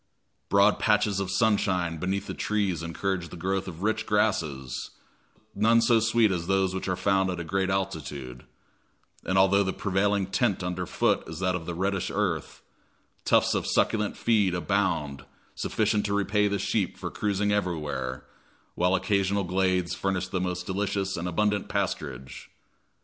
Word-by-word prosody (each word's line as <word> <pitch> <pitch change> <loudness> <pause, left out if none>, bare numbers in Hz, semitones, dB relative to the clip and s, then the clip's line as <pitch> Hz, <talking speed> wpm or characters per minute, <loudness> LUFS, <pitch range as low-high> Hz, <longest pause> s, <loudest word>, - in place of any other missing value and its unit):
Broad 100 +1 +4
patches 105 -2 +2
of 95 -2 -2
sunshine 95 -5 +1
beneath 95 +4 -2
the - - -5
trees 100 -6 -1
encourage 85 +1 -3
the - - -9
growth 95 +3 -2
of 90 0 -7
rich 110 +1 0
grasses, 80 - -1 0.6
none 115 +2 +4
so 115 0 +4
sweet 115 -1 +3
as 85 -2 -2
those 95 -1 +2
which 95 - -4
are 95 - 0
found 95 0 +1
at 90 -1 -3
a - - -3
great 95 +3 -1
altitude; 75 -10 -4 0.8
and, 95 - 0
although 95 +1 +5
the 95 -1 0
prevailing 100 0 +1
tint 95 +1 0
under 90 0 -3
foot - - +1
is 80 - -7
that 90 +1 0
of 85 -2 -4
the 85 - -3
reddish 95 +1 -1
earth, 95 -6 -2 0.6
tufts - - +4
of - - -1
succulent 105 -2 +1
feed 105 -6 +2
abound 90 -7 -1 0.3
sufficient 105 -1 0
to 100 - 0
repay 105 +1 +2
the 100 0 0
sheep - - -1
for - - -5
cruising 105 0 0
everywhere, 75 -10 -2 0.5
while 90 +2 +2
occasional 100 0 +1
glades 90 -1 0
furnish 95 -1 -1
the 95 -1 -2
most 90 0 -3
delicious 100 0 -1
and 85 +1 -3
abundant 105 +3 0
pasturage. 70 -10 -4
95 Hz, 160 wpm, -27 LUFS, 90-100 Hz, 0.8 s, although